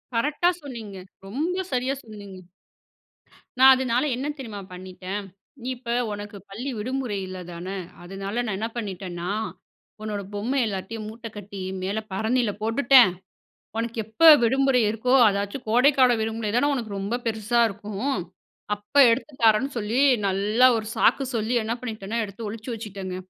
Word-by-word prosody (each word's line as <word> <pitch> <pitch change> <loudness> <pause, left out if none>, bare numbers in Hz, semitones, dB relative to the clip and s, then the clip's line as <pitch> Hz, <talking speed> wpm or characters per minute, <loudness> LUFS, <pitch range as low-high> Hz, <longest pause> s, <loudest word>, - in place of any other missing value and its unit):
கரெக்டா 295 +8 +2
சொன்னீங்க. 225 -8 -8 0.3
ரொம்ப 335 - -2
சரியா 255 +1 0
சொன்னீங்க. 205 -4 -10 1.2
நான் 265 0 +9
அதனால 255 0 0
என்ன 265 +4 -3
தெரியுமா 220 -6 -7
பண்ணிட்டேன். 185 +2 -6 0.4
"நீ 245 - -6
இப்ப 240 -1 -10 0.2
உனக்கு 205 0 -7
பள்ளி 240 +8 -5
விடுமுறை 250 -2 -2
இல்ல 185 0 -7
தானே, 185 +3 -6 0.3
அதனால 195 +3 -6
நான 215 -4 -2
என்ன 225 +2 -2
பண்ணிட்டேனா 185 -5 -5 0.7
உன்னோட 210 -2 -3
பொம்மை 240 +7 -1
எல்லாத்தயும் 210 +2 -4
மூட்ட 230 +2 -8
கட்டி 200 -1 -8 0.2
மேல 195 +4 -1
பரணில 220 +2 +1
போட்டுட்டேன். 240 -1 +6 0.7
உனக்கு 230 0 -3
எப்போ 220 +10 +2 0.2
விடுமுறை 265 +1 +3
இருக்கோ, 225 +4 +1
அதாச்சும் 200 +5 -3
கோடைக்கால 255 +2 +5
விடுமுறை 220 -1 -2
தானே 285 +4 +3
உனக்கு 235 -5 -4
ரொம்ப 200 +4 -2
பெருசா 225 +1 +1
இருக்கும். 210 +5 -3 0.6
அப்போ 205 +8 +1
எடுத்து 265 +4 -1
தாரேன்னு." 225 +5 +4
சொல்லி 225 +4 0 0.3
நல்லா 205 +6 +3
ஒரு 220 -1 -3
சாக்கு 275 - +3
சொல்லி 225 +2 -1
என்ன 225 +2 -1
பண்ணிட்டேன்னா 220 -2 -4
எடுத்து 210 +2 -7
ஒழிச்சி 225 +3 -7
வச்சிட்டேங்க. 195 -4 -6
220 Hz, 140 wpm, -25 LUFS, 200-250 Hz, 1.2 s, நான்